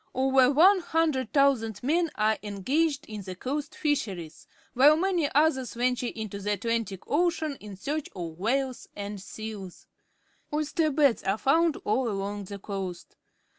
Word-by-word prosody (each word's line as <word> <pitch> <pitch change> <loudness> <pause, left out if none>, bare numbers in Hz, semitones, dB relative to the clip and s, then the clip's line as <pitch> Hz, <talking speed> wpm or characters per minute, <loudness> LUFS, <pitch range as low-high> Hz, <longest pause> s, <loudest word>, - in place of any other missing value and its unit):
Over 265 0 +4
100,000 280 - +3
men 330 +5 +2
are 215 0 +1
engaged 275 - 0
in 215 -2 -7
the 185 -1 -7
coast 280 +9 -4
fisheries, 180 - -2 0.3
while 290 +5 +6
many 350 -4 +1
others 285 -5 +2
ven 250 +2 +2
ture 245 -1 -3
into 215 -3 -5
the 205 +1 -1
Arctic 225 -5 -1
Ocean 320 -1 0
in 210 -2 -10
search 285 +10 -3
of 170 -2 -6
whales 255 +5 -1
and 200 -1 -6
seals. 210 -3 -8 0.7
Oyster 305 +1 0
beds 285 -4 +3
are 195 +2 0
found 320 +5 +3
all 240 +3 +1
along 200 0 -3
the 200 +2 -7
coast. 195 -3 -6
250 Hz, 140 wpm, -27 LUFS, 205-295 Hz, 0.7 s, while